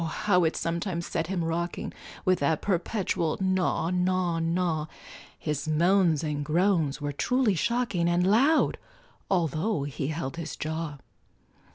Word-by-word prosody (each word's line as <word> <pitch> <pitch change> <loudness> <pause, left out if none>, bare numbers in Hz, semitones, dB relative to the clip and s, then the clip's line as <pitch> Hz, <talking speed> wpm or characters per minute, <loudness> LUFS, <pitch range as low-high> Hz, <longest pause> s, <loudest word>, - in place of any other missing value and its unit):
how 180 +3 +1
it 160 - +1
sometimes 170 +1 -2
set 165 -2 -2
him 180 -2 -1
rocking, 170 +1 -3 0.3
With 185 -1 +3
that 145 +2 +1
perpetual 180 -3 0
gnaw 185 -3 +1
gnaw 180 -2 +1
gnaw, 165 -2 0 0.5
His 150 -1 -3
moans 170 0 +3
and 150 -2 -2
groans 160 -2 +1
were 145 -1 -2
truly 250 - +1
shocking, 200 -3 0
And 175 +1 +2
loud, 260 +11 +3 0.5
altho' 170 -1 0
he 140 0 -3
held 155 -1 -4
his 165 -2 -5
jaw. 160 -1 -4
170 Hz, 135 wpm, -27 LUFS, 155-185 Hz, 0.5 s, With